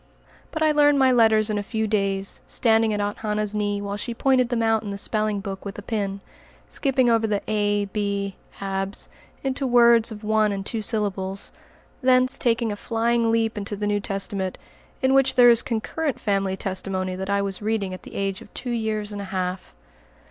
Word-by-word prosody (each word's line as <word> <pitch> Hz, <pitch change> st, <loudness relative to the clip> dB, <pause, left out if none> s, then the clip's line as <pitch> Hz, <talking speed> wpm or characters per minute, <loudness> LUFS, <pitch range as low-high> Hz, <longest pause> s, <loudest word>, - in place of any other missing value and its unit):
But 315 Hz, 0 st, -2 dB
I 310 Hz, -, +4 dB
learned 290 Hz, -1 st, +4 dB
my 265 Hz, -1 st, +5 dB
letters 220 Hz, -3 st, +4 dB
in 210 Hz, -, 0 dB
a -, -, -1 dB
few 220 Hz, +2 st, -2 dB
days, 195 Hz, -2 st, -1 dB
standing 225 Hz, -1 st, +2 dB
at 210 Hz, -, -1 dB
Aunt 205 Hz, 0 st, -2 dB
Hannah's 210 Hz, -1 st, -1 dB
knee 205 Hz, -1 st, -1 dB
while 200 Hz, 0 st, -3 dB
she 235 Hz, +3 st, -5 dB
pointed 255 Hz, -1 st, +2 dB
them 235 Hz, -2 st, 0 dB
out 225 Hz, -1 st, +2 dB
in 210 Hz, -, -6 dB
the 200 Hz, -, -4 dB
spelling 215 Hz, 0 st, 0 dB
book 195 Hz, 0 st, -6 dB
with 200 Hz, -1 st, -7 dB
a 205 Hz, -, -7 dB
pin, 200 Hz, -3 st, -3 dB, 0.5 s
skipping 265 Hz, -3 st, +1 dB
over 225 Hz, -1 st, +3 dB
the 205 Hz, -2 st, -1 dB
"a 205 Hz, -1 st, +1 dB
b 200 Hz, -1 st, -2 dB, 0.2 s
abs" 195 Hz, 0 st, -3 dB, 0.3 s
into 270 Hz, 0 st, -1 dB
words 235 Hz, -2 st, +5 dB
of 215 Hz, 0 st, -9 dB
one 215 Hz, 0 st, +2 dB
and 195 Hz, -1 st, -4 dB
two 225 Hz, +1 st, -2 dB
syllables, 195 Hz, -3 st, -2 dB, 0.5 s
thence 255 Hz, 0 st, +4 dB
taking 230 Hz, -2 st, +1 dB
a -, -, -3 dB
flying 230 Hz, +1 st, 0 dB
leap 225 Hz, -1 st, 0 dB
into 205 Hz, +1 st, -4 dB
the 205 Hz, +1 st, -3 dB
New 205 Hz, 0 st, +1 dB
Testament, 195 Hz, -1 st, -3 dB, 0.5 s
in 260 Hz, 0 st, +4 dB
which 270 Hz, -1 st, +3 dB
there 245 Hz, -1 st, +8 dB
is 235 Hz, 0 st, +5 dB
concurrent 265 Hz, +6 st, -2 dB
family 195 Hz, -2 st, 0 dB
testimony 185 Hz, -1 st, -2 dB
that 190 Hz, +1 st, -5 dB
I 200 Hz, 0 st, +1 dB
was 195 Hz, 0 st, -3 dB
reading 210 Hz, -3 st, -1 dB
at 185 Hz, -, -8 dB
the -, -, -12 dB
age 195 Hz, +1 st, -2 dB
of -, -, -14 dB
two 245 Hz, -, -4 dB
years 215 Hz, -2 st, -1 dB
and 205 Hz, -1 st, -5 dB
a -, -, -5 dB
half. 185 Hz, -, -4 dB
210 Hz, 200 wpm, -24 LUFS, 200-230 Hz, 0.5 s, there